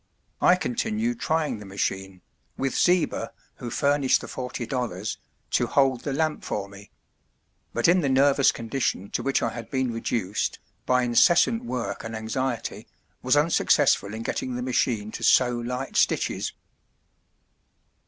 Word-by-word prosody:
I 180 - +6
continued 225 +3 -2
trying 155 -7 -1
the 105 - -10
machine, 95 -1 -3 0.4
with 135 0 -1
Zieber, 180 -1 +2 0.3
who 120 - -6
furnished 140 +1 +2
the - - -8
forty 125 -2 -5
dollars, 110 -5 -3 0.3
to - - +2
hold 135 -3 +2
the 145 - -3
lamp 155 +2 -1
for 100 -1 -3
me; 100 0 -14 0.8
but 120 - +1
in 180 +2 +4
the 140 - 0
nervous 135 +1 +4
condition 115 -4 -3
to - - -1
which 135 0 0
I - - +1
had 120 -1 -8
been 130 -3 -1
reduced, 110 -3 -2 0.3
by 125 0 +3
incessant 175 - +4
work 125 - -4
and 115 0 -6
anxiety, 115 +2 -3 0.3
was - - +3
unsuccessful 100 +2 +3
in 115 - -5
getting 125 +2 -3
the 125 - -3
machine 115 -4 0
to - - -7
sew 125 -1 +5
light 125 +3 -4
stitches. - - +1
125 Hz, 145 wpm, -25 LUFS, 115-140 Hz, 0.8 s, I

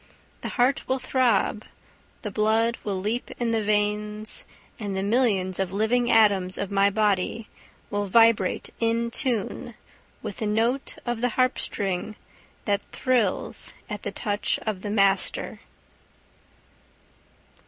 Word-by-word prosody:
The - - -4
heart 255 +3 +2
will 260 - +1
throb, 240 -5 +1 0.6
the 210 - -4
blood 220 +3 +2
will 195 -3 -2
leap 215 +6 -2
in 235 -1 0
the 225 -1 +1
veins, 210 +1 -1 0.3
and 200 -3 -3
the 190 - -1
millions 200 -5 +1
of 190 -2 -1
living 225 +4 +1
atoms 200 -5 +4
of 200 0 -3
my 200 0 +4
body 210 +1 0 0.4
will 205 0 -1
vibrate 225 -2 +3
in 230 0 0
tune 240 -2 0 0.5
with 210 -3 -5
the 215 - -2
note 230 +6 0
of 240 -2 -2
the 245 - +2
harp 255 +2 +1
string 195 +2 -1 0.5
that 200 0 +1
thrills 245 -7 0 0.2
at - - -4
the - - -4
touch 205 -2 0
of 210 -4 -2
the 205 - -4
master. 195 -2 +2
215 Hz, 130 wpm, -25 LUFS, 200-235 Hz, 0.6 s, atoms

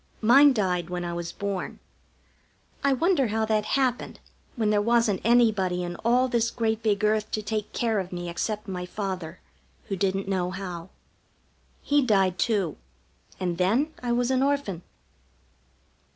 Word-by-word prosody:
Mine 275 +6 +7
died 180 -7 -1
when 180 0 -3
I 170 - -3
was 170 0 -4
born. 200 -1 -4 1.1
I 280 - +3
wonder 280 0 +2
how 220 +1 0
that 215 -1 +1
happened 255 -2 -1 0.4
when 220 -4 +1
there 205 -1 +3
wasn't 230 -3 +2
anybody 210 -7 +3
in 175 0 -4
all 245 +3 +2
this 235 -2 +1
great 225 -2 -1
big 210 -2 0
earth 215 0 +1
to 215 - -3
take 215 0 -3
care 225 -3 0
of 185 -1 -5
me 175 -1 -5
except 210 +5 -3
my 180 -2 -4
father, 185 -4 -5 0.5
who 195 - -1
didn't 195 +1 -1
know 185 -2 0
how. 180 -2 -6 0.9
He 290 0 +3
died, 195 -7 +2
too, 200 - 0 0.6
and 175 -2 -2
then 240 - +2
I 245 -1 -2
was 245 +1 +1
an 260 0 +2
Orphan. 275 -11 0
210 Hz, 155 wpm, -26 LUFS, 185-235 Hz, 1.1 s, Mine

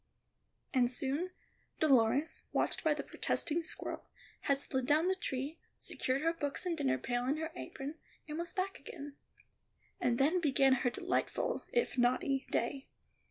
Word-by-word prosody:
And 250 -3 +4
soon 275 +7 0 0.5
Dolores, 275 +1 +3
watched - - +1
by 310 -2 +3
the 285 - -3
protesting 335 +1 0
squirrel, 320 - -5 0.3
had 275 -1 +1
slid 260 -2 -1
down 310 +4 +4
the 375 - +4
tree, 285 -4 -3 0.2
secured 260 +3 -1
her 330 +1 +3
books 295 0 -2
and 350 -2 0
dinner 130 - +1
pail 245 - -1
in 285 +3 +2
her 320 +1 -3
apron, 290 0 -6 0.3
and 305 +1 -4
was 340 +1 -2
back 385 +1 -2
again. 290 -3 -8 0.8
And 240 -1 +2
then 315 +7 +3
began 270 -3 +5
her 245 - +3
delightful, - - -1
if 475 - +1
naughty, 265 +3 +2
day. 265 +4 -1
285 Hz, 155 wpm, -34 LUFS, 260-325 Hz, 0.8 s, began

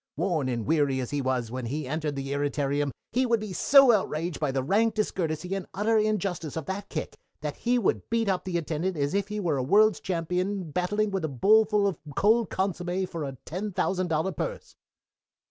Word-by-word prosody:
Worn 160 -5 0
and 120 -3 -2
weary 145 -4 +2
as 125 0 -4
he 145 -1 -1
was 130 -3 -1
when 125 -1 -4
he 145 +3 -3
entered 150 0 -2
the 135 0 -4
irritarium, 145 0 0 0.2
he 255 +2 +2
would 230 -1 +2
be 210 -3 -6
so 275 +6 +6
outraged 175 -5 -1
by 150 -3 0
the 135 -1 -1
rank 220 - +2
discourtesy 180 -4 -2
and 195 -1 -3
utter 215 +4 +1
injustice 195 -8 -1
of 160 - -4
that 195 +3 -5
kick 155 - -4 0.3
that 150 -1 -4
he 245 +1 +1
would 230 - 0
beat 230 -1 +1
up 190 -2 0
that 185 -2 -3
attendant 170 +2 -1
as 145 0 0
if 200 0 0
he 210 0 -4
were 165 -7 0
a 130 - 0
world's 210 +8 +4
champion 180 0 -2
battling 205 +5 0
with 195 -2 -2
a - - +1
bowlful 210 - +4
of 195 -6 0 0.2
cold 220 +2 +3
consommé 185 0 -1
for 165 -3 -5
a 135 -2 -5
ten 195 +6 -4
thousand 185 0 0
dollar 165 +3 0
purse." - - -5
180 Hz, 205 wpm, -27 LUFS, 145-205 Hz, 0.3 s, so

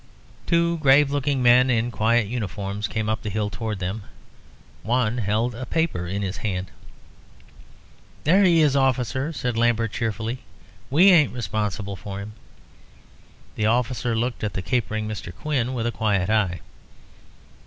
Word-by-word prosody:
Two 170 0 +2
grave 140 0 +5
looking 140 -2 0
men 125 +1 +6
in 120 0 +1
quiet 115 0 +2
uniforms 100 -2 -4
came 110 -1 -3
up 110 0 -1
the 105 - -4
hill 105 0 -2
towards 105 +1 -4
them. 95 +5 -3 0.8
One 120 0 0
held 110 +3 0
a 120 +2 -7
paper 160 - -1
in 100 +3 -3
his 95 -1 -3
hand. 95 -4 -3 1.5
"There 185 +7 +4
he 170 -3 +5
is, 145 -2 +3
officer," 130 +2 +1
said 125 -6 -3
Lambert, 115 -2 +2
cheerfully; 115 +2 -3 0.5
"we 175 +8 +6
ain't 155 -9 +5
responsible 105 -3 -3
for 100 +1 -7
him." 105 +2 -8 1.2
The 105 - 0
officer 120 0 0
looked 120 +1 -2
at 105 -2 -2
the 95 - -4
capering 110 -3 -1
Mr. 105 -4 -6
Quin 130 0 -2
with 115 -2 -2
a 120 - 0
quiet 105 -4 0
eye. 100 -5 +1
115 Hz, 150 wpm, -23 LUFS, 105-130 Hz, 1.5 s, men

